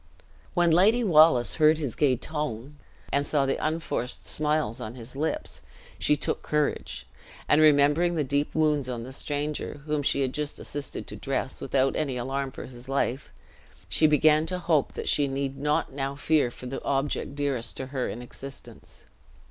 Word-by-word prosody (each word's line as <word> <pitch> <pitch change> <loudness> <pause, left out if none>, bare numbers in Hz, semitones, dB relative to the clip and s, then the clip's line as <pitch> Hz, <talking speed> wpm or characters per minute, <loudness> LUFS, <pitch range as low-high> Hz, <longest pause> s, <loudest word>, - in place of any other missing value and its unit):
When 175 -2 +4
Lady 210 +9 +5
Wallace 155 - +5
heard 155 0 +5
his 145 -7 -3
gay 135 -4 +3
tone, 145 -1 -5 0.4
and 140 - +3
saw 145 -1 +1
the 135 - -1
unforced 155 -5 -2
smiles 150 -6 -1
on 110 +1 -6
his 120 +1 -10
lips, 155 +3 -3 0.4
she 150 - +2
took - - -2
courage; 150 - -1 0.4
and, 150 - +5
remembering 155 +3 +4
the 155 - +1
deep 145 +2 -1
wounds 150 -4 +2
on 120 -2 -4
the 130 +2 -9
stranger, 145 +1 -3
whom 150 -1 0
she 140 0 +1
had 130 -1 0
just 150 0 -3
assisted 145 -1 -5
to - - -8
dress, 135 -1 -3
without 135 0 +1
any 140 -5 -1
alarm 135 +2 -2
for - - -8
his 125 +1 -12
life, 135 0 -1 0.6
she 155 - +4
began 155 +1 +4
to 180 - -1
hope 165 -5 +1
that - - -5
she 145 -1 +3
need 135 0 -2
not 150 -1 0
now 135 0 -3
fear 150 -2 +2
for 125 - -11
the 130 +2 -5
object 140 0 -1
dearest 140 -5 -2
to 130 - -4
her 130 -2 -1
in 120 +3 -6
existence. 135 +2 -11
145 Hz, 175 wpm, -27 LUFS, 130-150 Hz, 0.6 s, Lady